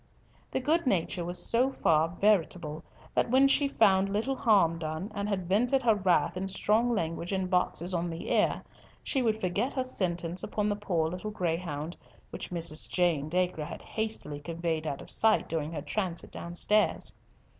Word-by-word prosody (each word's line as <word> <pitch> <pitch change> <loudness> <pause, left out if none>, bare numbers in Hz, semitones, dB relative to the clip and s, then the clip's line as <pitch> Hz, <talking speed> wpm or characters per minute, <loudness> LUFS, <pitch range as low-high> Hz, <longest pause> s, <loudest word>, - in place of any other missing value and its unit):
The - - -1
good 310 +4 +1
nature 180 -4 0
was 175 +1 -4
so 235 +9 +2
far 160 - +2
veritable 170 -5 0 0.3
that - - +1
when 265 +3 +5
she 280 +1 +3
found 195 -7 +3
little 225 +7 0
harm 195 -10 +3
done, 160 +6 -4
and 200 0 -3
had 190 -4 -2
vented 245 +8 +2
her 230 -2 +5
wrath 180 -4 +2
in 190 +1 -3
strong 220 +5 +1
language 165 -1 -3
and 190 -1 -1
boxes 180 0 0
on 175 0 -1
the 165 0 -5
ear, - - +2 0.4
she 270 - 0
would 220 -3 +1
forget 200 +7 -1
her 260 - 0
sentence 175 -7 -2
upon 210 0 -1
the 205 - 0
poor 175 -6 0
little 180 +5 -5
greyhound, 165 -4 -3 0.4
which - - -6
Mrs. 170 -3 -1
Jane 165 -5 +1
Dacre 180 -2 0
had - - -8
hastily 215 -10 -4
conveyed 165 0 -3
out 140 -2 -4
of - - -8
sight 220 -1 +4
during 160 -1 -2
her 150 -3 -5
transit 175 +1 -3
downstairs. 190 +5 +1
185 Hz, 175 wpm, -29 LUFS, 165-215 Hz, 0.4 s, when